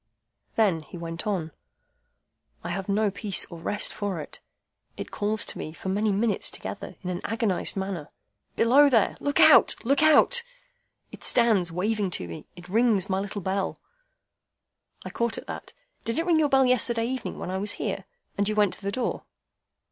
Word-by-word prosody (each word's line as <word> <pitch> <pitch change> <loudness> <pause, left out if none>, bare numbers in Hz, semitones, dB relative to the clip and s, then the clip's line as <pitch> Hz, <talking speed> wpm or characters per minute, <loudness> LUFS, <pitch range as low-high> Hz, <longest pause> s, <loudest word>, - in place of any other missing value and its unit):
Then 195 -8 +2
he 165 - -11
went 170 +2 -5
on. 175 -6 -2 1.1
"I - - -5
have 195 0 -4
no 205 +1 +2
peace 200 -1 +1
or 170 - -8
rest 205 +5 -1
for 200 -4 -3
it. 150 - -9 0.6
It - - -7
calls 210 +1 0
to - - -5
me, 155 - -6
for 180 +4 -6
many 210 +2 +1
minutes 210 +2 +1
together, - - -7
in 180 - -3
an 175 - -4
agonised 225 -4 0
manner, 190 -5 -4 0.5
'Below 275 +5 +5
there! 230 -6 +2
Look 285 0 -1
out! - - +8
Look 275 +4 +2
out!' 315 +11 +6 0.7
It - - -12
stands 215 -8 +2
waving 200 +3 -1
to 90 - -7
me. 85 - -9
It 180 0 -12
rings 210 -1 +2
my 190 - +1
little 200 +1 -5
bell—" 190 +1 -2 1.3
I - - -6
caught 235 -1 -1
at - - -7
that. - - -8 0.3
"Did 230 - -2
it 330 - 0
ring 335 -3 +3
your 300 -2 +2
bell 270 -1 +4
yesterday 235 -2 +2
evening 255 0 -4
when 180 - -5
I 190 - -2
was 205 +1 -2
here, - - -4 0.3
and 200 +1 +2
you 215 - -1
went 205 -3 +3
to - - -6
the 200 0 -3
door?" 255 +3 -3
205 Hz, 185 wpm, -26 LUFS, 190-235 Hz, 1.3 s, out